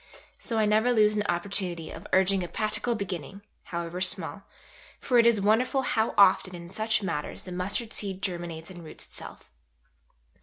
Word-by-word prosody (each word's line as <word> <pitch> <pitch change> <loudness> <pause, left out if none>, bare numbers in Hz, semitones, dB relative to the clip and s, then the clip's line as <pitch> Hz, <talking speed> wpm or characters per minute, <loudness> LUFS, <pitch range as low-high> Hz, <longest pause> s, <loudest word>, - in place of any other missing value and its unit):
So 230 - -3
I 215 - +3
never 215 +4 +3
lose 215 -2 +4
an 210 - +1
opportunity 175 -2 -1
of - - -9
urging 190 0 +3
a - - -4
practical 215 +5 -1
beginning, 195 -2 -5 0.2
however 170 +1 -4
small, 185 - 0 0.5
for 245 -3 +3
it 235 - +6
is 230 -3 +4
wonderful 235 +6 +2
how 220 -3 0
often 185 -2 +5
in 170 0 -10
such 220 0 0
matters 150 -6 -3
the 185 - -8
mustard 200 +6 -2
seed 195 -2 -3
germinates 170 -2 -4
and 175 -2 -10
roots 160 - -6
itself." - - -8
195 Hz, 165 wpm, -28 LUFS, 175-220 Hz, 0.5 s, it